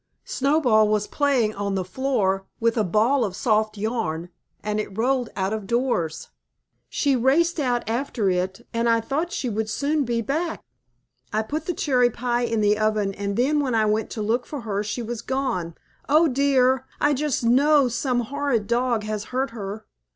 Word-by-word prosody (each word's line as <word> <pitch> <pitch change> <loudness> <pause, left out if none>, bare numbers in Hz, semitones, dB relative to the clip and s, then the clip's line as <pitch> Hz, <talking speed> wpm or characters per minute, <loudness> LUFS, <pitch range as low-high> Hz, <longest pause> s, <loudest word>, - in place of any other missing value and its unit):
Snowball 260 -6 +3
was 210 -1 +1
playing 260 -7 +1
on 200 -1 -2
the 185 -1 -1
floor, 195 -4 0
with 230 0 +2
a 220 - +2
ball 225 +8 +2
of 195 -4 -3
soft 215 -1 +1
yarn, 200 -7 -2 0.3
and 210 0 -1
it 200 -2 -5
rolled 250 +1 +1
out 190 +1 -1
of 215 -3 -4
doors. 235 -10 -1 0.6
She 280 -2 +1
raced 315 +8 +2
out 245 -5 0
after 230 -2 -1
it, 190 +4 -1
and 230 0 +1
I 230 0 +4
thought 290 +9 -2
she 260 - -2
would 220 -1 -2
soon 285 +6 0
be 235 -2 -1
back. 320 +7 -2 0.7
I 215 +1 0
put 305 +7 -4
the 355 - -1
cherry 250 -4 +3
pie 240 +1 -1
in 225 -2 0
the 210 0 +3
oven 215 -2 +1
and 200 0 -3
then 285 +5 +2
when 260 -5 0
I 220 -1 +3
went 215 0 0
to 215 - -1
look 235 +4 0
for 290 -4 -5
her 205 -3 -2
she 215 +3 -4
was 230 0 -5
gone. 235 -11 -2 0.3
Oh, 310 +3 +5
dear! 260 -1 +2
I 290 - +3
just 285 -2 -1
know 275 +4 +4
some 245 +1 0
horrid 270 -3 -1
dog 235 -1 0
has 215 0 -3
hurt 260 +1 -2
her." 210 -1 -6
235 Hz, 185 wpm, -24 LUFS, 210-270 Hz, 0.7 s, Oh